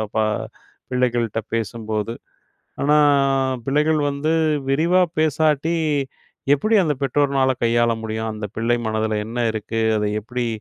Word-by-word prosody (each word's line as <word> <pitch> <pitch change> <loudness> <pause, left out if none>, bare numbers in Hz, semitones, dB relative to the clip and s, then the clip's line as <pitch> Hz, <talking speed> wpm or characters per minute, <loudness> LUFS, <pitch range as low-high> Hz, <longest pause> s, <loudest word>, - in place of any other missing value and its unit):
ப - - 0 0.7
பிள்ளைகள் 125 -2 +1
கிட்ட 115 +1 -3
பேசும்போது. 110 -1 -3 0.7
ஆனா 150 +2 +4 0.7
பிள்ளைகள் 150 +3 +2
வந்து 145 +3 -1 0.4
விரிவா 170 +6 +3 0.2
பேசாட்டி 155 +1 +1 0.8
எப்டி 215 +11 +1
அந்த 150 - 0
பெற்றோர்னால 135 -1 +2
கையாள 120 0 +3
முடியும்? 110 0 -3
அந்த 105 -1 -5
பிள்ளை 115 +2 +1
மனதுல 110 -1 -1
என்ன 115 +2 -6
இருக்கு? 110 +1 -3 0.2
அதை 105 0 -1
எப்டி 120 +2 -3
120 Hz, 120 wpm, -21 LUFS, 110-150 Hz, 0.8 s, ஆனா